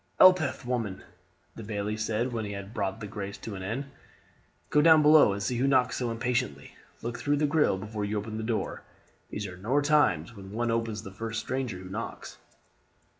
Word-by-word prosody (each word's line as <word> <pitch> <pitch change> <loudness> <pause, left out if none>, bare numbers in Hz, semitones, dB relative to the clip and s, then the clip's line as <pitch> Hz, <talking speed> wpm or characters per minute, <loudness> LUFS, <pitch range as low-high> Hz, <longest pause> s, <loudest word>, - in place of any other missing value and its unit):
"Elspeth, 185 -9 +5
woman," 115 -6 -2 0.5
the - - -9
bailie 105 0 -3
said 110 +3 -1
when 115 -2 -2
he 100 -1 -4
had 100 +1 -7
brought 100 0 -2
the - - -4
grace 100 -1 -6
to 110 - -7
an 95 - -6
end, 115 +9 -3 0.9
"go 150 - +5
down 160 -1 +7
below 150 -7 +7
and 100 0 -3
see 120 +5 -1
who 130 +3 +2
knocks 130 -2 +3
so 125 -2 -1
impatiently; 115 - -2 0.3
look 115 0 -4
through 145 0 +1
the 150 - +2
grille 150 -9 +3
before 105 +2 -5
you 105 +1 -1
open 110 +1 -4
the 110 - -3
door; 110 -3 -2 0.5
these 105 - -4
are 90 -2 -7
nor 120 +10 +1
times 145 -5 +2
when 95 -1 -10
one 120 +2 -1
opens 115 -2 -1
to 100 - -7
the - - -18
first 115 +1 -3
stranger 130 -4 -3
who 90 0 -9
knocks." 105 +5 -6
115 Hz, 205 wpm, -28 LUFS, 100-125 Hz, 0.9 s, down